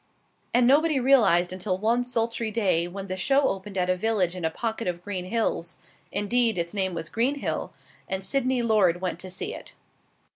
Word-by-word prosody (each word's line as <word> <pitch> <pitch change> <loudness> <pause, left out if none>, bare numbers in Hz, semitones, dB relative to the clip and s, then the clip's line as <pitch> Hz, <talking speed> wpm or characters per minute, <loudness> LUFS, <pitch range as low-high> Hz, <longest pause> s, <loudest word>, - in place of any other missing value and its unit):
And 245 0 +4
nobody 295 +3 +4
realized 200 -10 +4
until 185 0 -2
one 230 +5 +1
sultry 230 -2 -1
day 190 -6 +1
when 195 +2 -7
the 185 -1 -4
show 270 +9 +2
opened 195 +1 -5
at 180 -1 +1
a 185 - +2
village 185 -3 0
in 180 - -6
a 160 - +2
pocket 225 +5 -4
of 175 -1 -3
green 185 -3 -4
hills 205 -4 -2 0.3
indeed, 225 +1 +2
its 170 +1 -2
name 190 -3 0
was 165 0 -5
Greenhill 265 +5 -1 0.4
and 190 0 -1
Sydney 260 -1 0
Lord 200 -7 +3
went 180 -2 -3
to 185 - -7
see 185 - -4
it. - - -10
205 Hz, 185 wpm, -26 LUFS, 180-235 Hz, 0.4 s, And